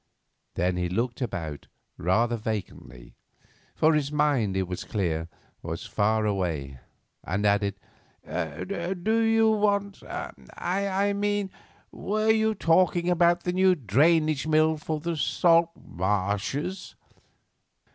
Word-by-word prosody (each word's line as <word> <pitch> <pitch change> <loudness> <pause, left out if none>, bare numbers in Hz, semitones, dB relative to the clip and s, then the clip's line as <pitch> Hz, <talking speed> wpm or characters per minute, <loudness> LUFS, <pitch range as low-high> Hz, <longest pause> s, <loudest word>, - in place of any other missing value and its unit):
Then 90 +1 0
he 90 -1 -1
looked 120 +7 -2
about 85 - -4 0.3
rather 115 +7 +1
vacantly, 95 - -6 0.6
for 160 +1 +4
his 150 -2 0
mind, 140 -10 +1
it 95 -1 -1
was 90 0 -5
clear, 85 -5 -2 0.3
was - - -5
far 110 +1 +1
away, 80 -10 -2 0.4
and 100 +5 -2
added, 100 -1 +2 0.5
"Do 180 - -2
you 225 0 +4
want: 200 -2 0
I 195 - -3
mean, 205 -1 -1 0.4
were 215 +2 0
you 220 0 +2
talking 175 0 +2
about 175 0 +3
the 180 - -1
new 185 0 +4
drainage 155 - +2
mill 155 0 +3
for 155 0 -3
the 170 +2 -3
salt 165 +5 +3
marshes?" 105 - -2
150 Hz, 115 wpm, -26 LUFS, -, 0.6 s, for